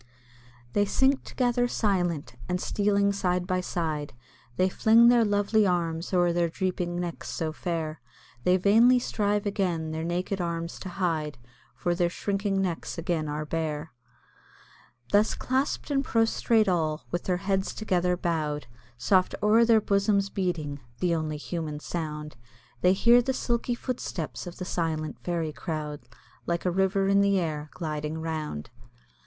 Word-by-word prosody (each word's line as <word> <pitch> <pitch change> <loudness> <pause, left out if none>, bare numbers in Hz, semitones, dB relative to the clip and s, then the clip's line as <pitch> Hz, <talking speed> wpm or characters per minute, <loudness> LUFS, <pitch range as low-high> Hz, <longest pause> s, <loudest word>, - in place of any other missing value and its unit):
They 205 - +3
sink 265 +6 +2
together 245 -1 +1
silent, 175 - -1
and 180 0 0
stealing 200 0 +1
side 180 -2 0
by 185 0 0
side, 155 -7 -3 0.4
They 185 - +4
fling 225 +5 +5
their 240 -1 +5
lovely 205 0 +2
arms 170 -2 -1
o'er 175 -2 +3
their 170 -1 +1
drooping 175 -1 -2
necks 175 -1 -5
so 160 -1 -2
fair, 160 -3 -3 0.4
Then 180 +1 +4
vainly 225 +6 +6
strive 210 -4 0
again 180 -6 -1
their 160 0 -3
naked 180 +3 -2
arms 170 -1 -3
to 190 - -6
hide, 165 -5 -1 0.4
For 175 - 0
their 175 0 +1
shrinking 195 +2 -1
necks 175 -2 -3
again 165 -2 -1
are 150 +1 -3
bare. 155 -1 -3 1.2
Thus 205 +2 +3
clasp'd 265 +3 -1
and 275 -1 +2
prostrate 225 -2 +2
all, 160 -4 0
with 175 - -2
their 180 -1 +1
heads 195 0 -1
together 180 -4 0
bow'd, 155 -4 -1 0.3
Soft 185 +10 +2
o'er 220 +2 +5
their 225 -2 +5
bosom's 200 -1 +1
beating 165 -7 -2 0.2
the 180 -2 +1
only 155 -2 -2
human 155 -1 -4
sound 150 -3 -5 0.4
They 180 - +5
hear 235 +5 +6
the 265 +2 -1
silky 240 -1 -1
footsteps 225 - -4
of 175 - -8
the 185 - -5
silent 160 -3 -2
fairy 165 -3 -2
crowd, 150 -4 -4 0.5
Like 170 +1 -1
a 180 - +2
river 190 +1 +2
in 200 0 +4
the 200 -1 +3
air, 155 -3 -3
gliding 155 -2 -3
round. 155 - -4
180 Hz, 150 wpm, -27 LUFS, 160-200 Hz, 1.2 s, vainly